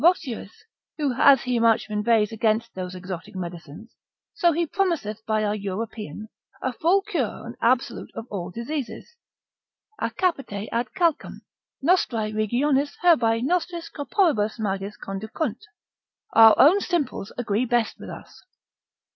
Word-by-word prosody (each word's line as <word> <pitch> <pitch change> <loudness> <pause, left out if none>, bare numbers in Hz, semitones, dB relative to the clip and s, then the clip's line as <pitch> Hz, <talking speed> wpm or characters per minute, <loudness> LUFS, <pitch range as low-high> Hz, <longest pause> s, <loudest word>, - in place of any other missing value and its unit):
Voschius, 295 - +1 0.3
who 290 -4 0
as 270 +1 +6
he 250 -1 0
much 230 -1 +3
inveighs 210 0 +2
against 220 0 0
those 185 0 -6
exotic 185 +2 -7
medicines, 175 +3 -8 0.4
so 345 -2 +3
he 335 +2 0
promiseth 305 - -1
by 215 -1 +1
our 205 0 +1
European, 210 -1 -5 0.3
a 260 - -2
full 360 +10 +2
cure 335 - -3
and 235 +1 -8
absolute 250 +2 +1
of 225 - -6
all 180 -3 -4
diseases; 265 - -5 0.8
a - - 0
capite 275 - -2
ad 235 +1 0
calcem, 340 -4 0 0.4
nostrae 240 -10 +2
regionis 270 +7 +1
herbae 235 -10 +4
nostris 340 +2 -1
corporibus 285 - +1
magis 200 -1 -3
conducunt, 215 +10 -4 0.7
our 225 -1 +8
own 330 +9 +7
simples 285 - -2
agree 235 0 0
best 240 -2 0
with - - -9
us. - - -11
230 Hz, 130 wpm, -24 LUFS, 210-295 Hz, 0.8 s, our